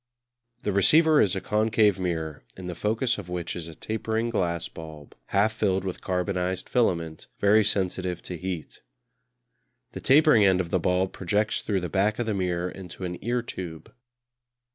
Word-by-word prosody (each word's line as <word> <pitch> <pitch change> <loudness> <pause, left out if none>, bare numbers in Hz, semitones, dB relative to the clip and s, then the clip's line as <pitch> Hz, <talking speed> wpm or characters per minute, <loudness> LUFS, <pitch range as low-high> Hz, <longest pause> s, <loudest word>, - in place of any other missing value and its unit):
The 105 - 0
receiver 155 - +5
is 95 -2 +2
a 95 - -2
concave 105 -2 +2
mirror, 80 -4 -3
in 95 - -8
the 90 - -4
focus 110 +6 0
of 90 -3 -9
which 90 -1 -3
is 85 -2 -6
a 80 - -9
tapering 110 +3 -2
glass 85 -5 -1
bulb, 80 -3 -11
half 105 +3 +2
filled 95 -4 0
with 95 -2 -5
carbonised 90 0 -2
filament 85 -10 0
very 105 +2 +5
sensitive 95 -3 -1
to 90 - -5
heat. 90 -2 -6 1.1
The - - -7
tapering 145 -5 +5
end 95 -2 +4
of 85 -3 -3
the 95 - +2
bulb 90 +2 +1
projects 105 +4 0
through 100 -3 -1
the 90 - -3
back 105 +2 +1
of 120 - -1
the 110 - -1
mirror 90 -2 -1
into 95 -1 -9
an 90 0 -6
ear 120 +2 0
tube. 85 -8 -7
95 Hz, 170 wpm, -26 LUFS, 90-110 Hz, 1.1 s, receiver